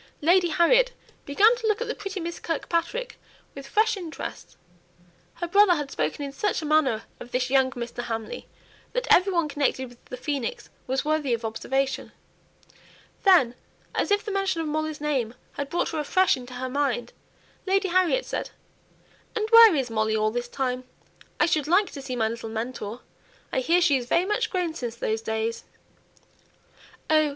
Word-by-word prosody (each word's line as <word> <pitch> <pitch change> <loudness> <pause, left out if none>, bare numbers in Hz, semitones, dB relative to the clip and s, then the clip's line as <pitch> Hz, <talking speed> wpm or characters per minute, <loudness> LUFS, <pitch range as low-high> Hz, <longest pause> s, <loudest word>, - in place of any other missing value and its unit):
Lady 350 +3 +4
Harriet 485 +10 +4 0.3
began 415 +12 +5
to 470 -2 -3
look 425 0 +2
at 480 - -3
the 480 - -1
pretty 395 -3 -6
Miss 340 0 -5
Kirkpatrick 340 +9 -2 0.3
with 275 -1 -9
fresh 435 +8 +2
interest; 345 -5 -7 0.8
her 345 - -4
brother 395 0 +5
had 295 -3 -4
spoken 155 - -2
in 280 - -6
such 415 +9 0
a 315 - -5
manner 300 -7 +2 0.2
of 240 - -10
this 250 0 -1
young 265 -1 +4
Mr. 240 0 -5
Hamley 225 -2 -5 0.5
that - - -1
every 380 +2 +4
one 340 -4 +1
connected 280 -3 -1
with 245 0 -19
the 250 - -7
phoenix 275 -2 -3 0.2
was 265 +2 -1
worthy 300 -5 +1
of 230 0 -7
observation. 270 +5 -2 1.1
Then, 355 - +5 0.4
as - - 0
if 410 +1 +2
the 425 - -3
mention 390 -3 0
of 325 - -2
Molly's 310 0 -2
name 260 -6 -1 0.2
had 285 -1 -5
brought 345 - 0
her 320 - -3
afresh 370 +5 +3
into 250 0 -9
her 255 +1 -3
mind, 255 -3 -1 0.5
Lady 390 0 +2
Harriet 370 +7 +2
said, - - -4 0.9
"And 430 -1 0
where 460 -5 +9
is 260 -4 -1
Molly 220 0 +1
all 215 0 +1
this 240 +1 -3
time? 255 -1 -2 0.6
I - - +5
should 310 -4 0
like 370 +4 +3
to 280 - -7
see 265 -2 -5
my 225 -2 +1
little 230 0 -5
mentor. 230 0 -5 0.5
I - - +2
hear 335 +7 +3
she 285 -5 +4
is 245 -2 -6
very 340 +7 +2
much 420 +3 0
grown 360 -4 -1
since 240 -7 -5
those 220 -1 -2
days." 220 +1 -2 1.4
"Oh! 310 -1 +4
295 Hz, 180 wpm, -25 LUFS, 250-370 Hz, 1.4 s, where